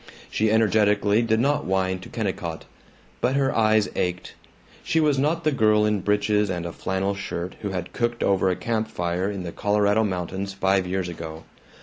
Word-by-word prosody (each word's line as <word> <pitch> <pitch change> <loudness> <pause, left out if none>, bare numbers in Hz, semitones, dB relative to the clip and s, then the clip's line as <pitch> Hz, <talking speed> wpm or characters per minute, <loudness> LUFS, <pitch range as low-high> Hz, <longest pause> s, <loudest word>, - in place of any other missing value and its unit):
She 110 0 +1
energetically 105 -1 +3
did 110 -1 +1
not 145 +4 +1
whine 95 -1 0
to 95 - -11
Kennicott. 95 -7 -4 0.6
But 130 +2 +1
her 135 -1 +1
eyes 110 -1 +3
ached; 90 0 -2 0.5
she 160 - +1
was 150 -3 +2
not 160 +4 +1
the 155 - +2
girl 110 -5 +3
in 105 -2 +1
breeches 105 +1 +1
and 90 -2 -3
a 85 - -4
flannel 95 +1 -1
shirt 90 -2 -5
who 100 - -4
had 90 -2 -5
cooked 120 -1 -1
over 95 -1 +2
a 90 - +1
camp 110 +1 -2
fire 90 -2 -2
in 100 -3 -4
the 85 - -5
Colorado 105 +2 +2
mountains 95 0 -3
five 95 -1 +1
years 95 0 -1
ago. 80 -2 -7
100 Hz, 185 wpm, -24 LUFS, 95-110 Hz, 0.6 s, energetically